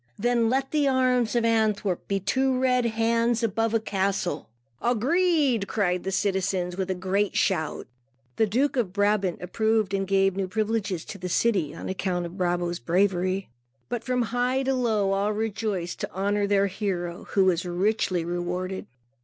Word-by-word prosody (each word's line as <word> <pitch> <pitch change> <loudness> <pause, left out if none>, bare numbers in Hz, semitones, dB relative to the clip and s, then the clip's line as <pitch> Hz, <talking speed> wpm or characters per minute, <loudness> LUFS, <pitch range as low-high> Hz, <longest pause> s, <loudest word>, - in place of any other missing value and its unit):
Then, 235 0 +2
let 270 +2 0
the 295 -2 +2
arms 255 -3 +2
of 235 -1 +2
Antwerp 215 -5 +1
be 200 0 0
two 260 +7 +1
red 250 -1 +2
hands 230 +1 +1
above 225 +1 0
a - - +4
castle." 195 - -2 0.3
"Agreed," 265 - +2
cried 180 -4 0
the 190 - -2
citizens 190 -2 0
with 190 0 -3
a 185 - 0
great 190 +3 0
shout. 160 -5 0 0.5
The 220 - +3
Duke 260 +8 +1
of 210 -7 0
Brabant 205 -3 +1
approved 220 +2 0
and 195 -1 0
gave 195 -1 +2
new 195 -1 -1
privileges 215 -3 -1
to 200 - -8
the 180 0 -4
city, 190 -6 +1
on - - -7
account 185 -2 -2
of 170 +1 -8
Brabo's 175 -2 -1
bravery. 185 +4 0 0.4
So, 240 - 0
from 250 +1 0
high 250 +2 +1
to 270 0 +1
low, 220 -6 +1
all 200 +2 +1
rejoiced 210 -4 -2
to - - -4
honor 200 +2 0
their 200 -1 +3
hero, 185 -3 -3
who 195 -2 +5
was 180 -2 +2
richly 180 -1 0
rewarded. 180 +2 -3
200 Hz, 165 wpm, -26 LUFS, 185-230 Hz, 0.5 s, who